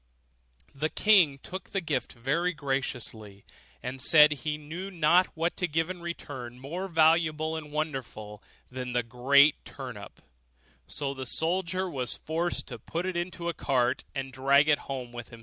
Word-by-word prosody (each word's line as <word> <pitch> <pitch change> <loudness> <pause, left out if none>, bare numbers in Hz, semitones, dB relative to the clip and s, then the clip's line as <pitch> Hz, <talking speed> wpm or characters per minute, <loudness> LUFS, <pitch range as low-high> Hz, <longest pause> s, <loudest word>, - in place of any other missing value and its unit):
The 150 +3 -1
king 180 -10 +4
took 185 +7 -8
the 195 - -1
gift 155 -8 -2
very 155 +9 0
graciously, 125 -8 -3 0.4
and 130 +1 -4
said 150 +2 +7
he 150 +1 -2
knew 165 +6 -7
not 175 0 +4
what 165 +2 0
to 180 - 0
give 165 +2 0
in 180 -2 -8
return 135 -8 -7
more 165 +9 -5
valuable 160 -1 +3
and 150 -2 -7
wonderful 130 -9 -4 0.3
than 125 -1 -5
the 120 -1 +1
great 135 +5 +4
turnip; 125 -7 -9 0.7
so 140 -1 -2
the 130 -2 -6
soldier 185 +5 0
was 130 -8 -1
forced 165 +2 -2
to - - -7
put 170 +2 -4
it 185 -1 -2
into 175 0 -3
a 170 - 0
cart, 125 -5 0
and 135 -1 -4
drag 140 +3 +4
it 150 -2 +4
home 130 -3 -4
with 120 -1 -8
him. 115 - -12
150 Hz, 165 wpm, -28 LUFS, 130-170 Hz, 0.7 s, said